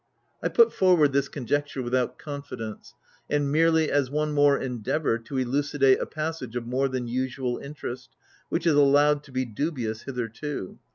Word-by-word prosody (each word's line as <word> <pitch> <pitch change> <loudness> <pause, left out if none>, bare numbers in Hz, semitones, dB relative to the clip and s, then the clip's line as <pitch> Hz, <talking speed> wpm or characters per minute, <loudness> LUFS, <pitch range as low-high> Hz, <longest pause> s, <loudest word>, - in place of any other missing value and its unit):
I - - 0
put 465 -1 +4
forward 175 -7 +4
this 140 0 +1
conjecture 145 0 -2
without 125 0 0
confidence, 130 -7 -7 0.3
and 145 -1 +1
merely 160 0 +3
as 140 -3 +2
one 150 +2 -1
more 145 -1 +4
endeavour 125 +1 -1
to 125 +4 -6
elucidate 135 +1 +2
a - - -3
passage 155 -6 -4
of 120 -1 -3
more 130 +3 0
than 130 -2 -3
usual 125 +1 -2
interest, 130 -4 -7 0.4
which - - -1
is 165 - +4
allowed 145 +1 +4
to - - -15
be 130 0 -1
dubious 120 -2 -3
hitherto. 125 -2 -5
140 Hz, 160 wpm, -26 LUFS, 125-150 Hz, 0.4 s, put